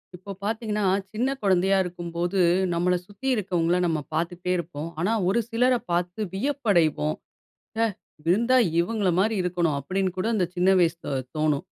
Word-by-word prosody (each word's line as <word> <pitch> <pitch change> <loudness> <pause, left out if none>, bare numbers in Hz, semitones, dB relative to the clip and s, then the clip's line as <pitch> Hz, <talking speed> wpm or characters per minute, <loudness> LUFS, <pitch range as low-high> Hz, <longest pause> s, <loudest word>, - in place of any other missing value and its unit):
இப்போ 190 +3 -9
பாத்தீங்கன்னா, 215 0 -2 0.3
சின்ன 240 +5 0
குழந்தையா 190 0 +3
இருக்கும்போது 175 +1 -3 0.3
நம்மள 180 +2 +2
சுத்தி 205 +6 -8
இருக்கவங்கள 180 -4 +1
நம்ம 160 -2 0
பார்த்துட்டே 175 +3 -2
இருப்போம். 165 -2 -5
ஆனா, 190 +7 +1 0.2
ஒரு 200 - +2
சிலர 250 +3 +3 0.2
பார்த்து 175 +3 -1
வியப்படைவோம். 190 - +1 0.6
ஹ! - - -1 0.5
இருந்தா 235 +8 +4 0.2
இவங்கள 200 +2 +1
மாரி 220 +2 +2
இருக்கனும்! 175 -4 0
அப்டின்னு 185 +6 -1
கூட 185 +4 -1
இந்த 185 - +2
சின்ன 180 +2 +3
வயசுல 165 -3 0 0.2
தோணும். 150 -2 +1
180 Hz, 140 wpm, -25 LUFS, 170-210 Hz, 0.6 s, இருந்தா